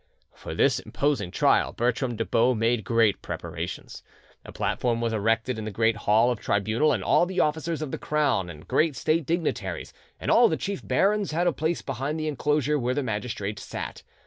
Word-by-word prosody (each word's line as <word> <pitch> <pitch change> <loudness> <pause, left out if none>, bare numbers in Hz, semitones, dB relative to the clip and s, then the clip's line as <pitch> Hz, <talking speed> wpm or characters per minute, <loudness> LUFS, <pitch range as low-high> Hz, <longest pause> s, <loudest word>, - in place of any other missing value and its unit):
For - - -8
this - - +3
imposing 145 -10 -1
trial - - +2
Bertram 120 +1 0
de - - -2
Baux 120 +2 +2
made 115 0 +1
great 115 -2 +2
preparations. 85 0 -6 0.4
A - - -10
platform 120 -2 -1
was 115 -1 -1
erected 115 +3 0
in 110 - -5
the - - -3
great 110 +2 +1
hall 110 +3 +3
of 120 - -3
tribunal, 110 +9 +1
and 110 -9 -1
all 175 - +3
the 190 0 -3
officers 155 +1 0
of 145 - -5
the - - -4
crown 145 -12 0
and 75 -2 -11
great 155 -3 +2
state 155 0 0
dignitaries, 170 +1 -2 0.3
and - - -1
all 235 0 +7
the 160 - 0
chief 200 -1 -4
barons, 200 -3 +1
had 170 +3 +1
a 175 - +2
place 160 +4 -1
behind 135 +4 -3
the 155 - -2
enclosure 150 0 +1
where 125 0 -1
the 145 - 0
magistrates 105 -3 -3
sat. - - -6
125 Hz, 195 wpm, -26 LUFS, 110-155 Hz, 0.4 s, all